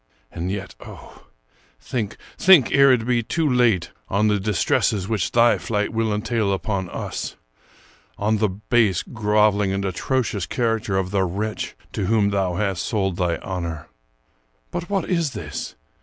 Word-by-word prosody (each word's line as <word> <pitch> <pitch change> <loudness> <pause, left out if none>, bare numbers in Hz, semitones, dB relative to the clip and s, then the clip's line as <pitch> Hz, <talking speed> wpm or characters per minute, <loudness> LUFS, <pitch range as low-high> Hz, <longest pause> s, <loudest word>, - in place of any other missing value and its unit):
And 85 +2 -4
yet, 100 -1 -5
oh, - - -13 0.5
think 110 -5 -4
— - - -22
think 180 -10 +6
ere 140 -1 +6
it 120 -3 +2
be 120 -1 +2
too 160 +7 -1
late 120 - +2
— - - -38
on 105 +2 +2
the 105 -1 +2
distresses 100 0 +1
which 105 -5 0
thy 120 0 +4
flight 105 -1 -2
will 115 -1 0
entail 105 0 0
upon 95 -2 -2
us; - - -5 0.8
on 105 +2 +1
the 110 -1 +2
base, 105 -1 +1
groveling, 105 -2 +2
and 100 0 -1
atrocious 105 - -1
character 115 -4 0
of 95 -1 -1
the 100 -1 +1
wretch 105 +4 -3 0.2
to 95 - -2
whom 105 -2 +2
thou 95 -3 0
hast 95 -2 -1
sold 95 -5 -1
thy 90 -2 +1
honor. 85 -5 -5 0.8
But 175 0 -4
what 200 -2 -1
is 170 -6 0
this? 80 -10 -6
105 Hz, 160 wpm, -22 LUFS, 95-115 Hz, 0.8 s, think